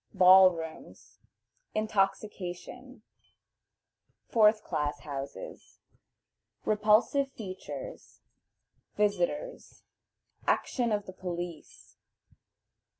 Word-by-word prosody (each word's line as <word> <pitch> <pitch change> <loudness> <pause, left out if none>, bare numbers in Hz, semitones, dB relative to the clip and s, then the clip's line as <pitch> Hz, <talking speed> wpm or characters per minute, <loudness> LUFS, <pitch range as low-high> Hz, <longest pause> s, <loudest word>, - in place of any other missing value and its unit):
Ball 185 0 +8
rooms. 165 -2 -9 0.6
Intoxication. 215 +3 -2 1.3
Fourth 215 -1 +4
Class 145 -1 -2
Houses. 140 - -8 0.9
Repulsive 215 +6 +3
Features. 220 - -8 0.7
Visitors. 210 - -2 0.6
Action 240 -3 +1
of 205 -1 0
the 185 - -9
Police. 175 -3 -7
205 Hz, 60 wpm, -29 LUFS, 175-220 Hz, 1.3 s, Ball